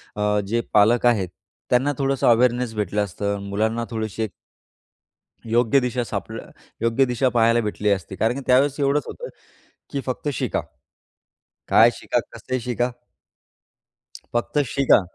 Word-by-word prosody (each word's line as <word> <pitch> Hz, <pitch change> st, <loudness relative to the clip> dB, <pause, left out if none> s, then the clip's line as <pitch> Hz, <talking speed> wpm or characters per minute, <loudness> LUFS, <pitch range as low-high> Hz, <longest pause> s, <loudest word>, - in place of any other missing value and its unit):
अ, 105 Hz, 0 st, +1 dB
जे 115 Hz, +3 st, 0 dB
पालक 115 Hz, +4 st, +4 dB
आहेत 105 Hz, -7 st, +3 dB, 0.4 s
त्यांना 130 Hz, +4 st, +3 dB
थोडंसं 135 Hz, -1 st, 0 dB
अवेअरनेस 120 Hz, 0 st, +3 dB
भेटलं 105 Hz, 0 st, 0 dB
असतं 100 Hz, +2 st, -3 dB
आणि 100 Hz, 0 st, -7 dB
मुलांना 110 Hz, +3 st, 0 dB
थोडीशी 110 Hz, -1 st, -3 dB
एक 105 Hz, -, -4 dB, 1.2 s
योग्य 120 Hz, +3 st, +4 dB
दिशा 125 Hz, 0 st, -1 dB
सापड -, -, -5 dB, 0.4 s
योग्य 115 Hz, +3 st, +3 dB
दिशा 125 Hz, +1 st, +1 dB
पाहायला 115 Hz, 0 st, +3 dB
भेटली 105 Hz, -1 st, -1 dB
असती. 95 Hz, -1 st, -1 dB
कारण 110 Hz, +4 st, +1 dB
की 140 Hz, -, -5 dB
त्यावेळेस 135 Hz, +3 st, +3 dB
एवढंच 140 Hz, +1 st, +2 dB
होतं 485 Hz, -, -7 dB, 0.6 s
की 140 Hz, -, -2 dB
फक्त 130 Hz, +3 st, -3 dB
शिका. -, -, -1 dB, 1.1 s
काय -, -, +6 dB
शिका? -, -, -1 dB
कसं 130 Hz, -1 st, -4 dB
शिका? 120 Hz, +1 st, -1 dB, 1.4 s
फक्त 120 Hz, +5 st, 0 dB
शिका! 140 Hz, -6 st, +4 dB
120 Hz, 140 wpm, -23 LUFS, 105-130 Hz, 1.4 s, काय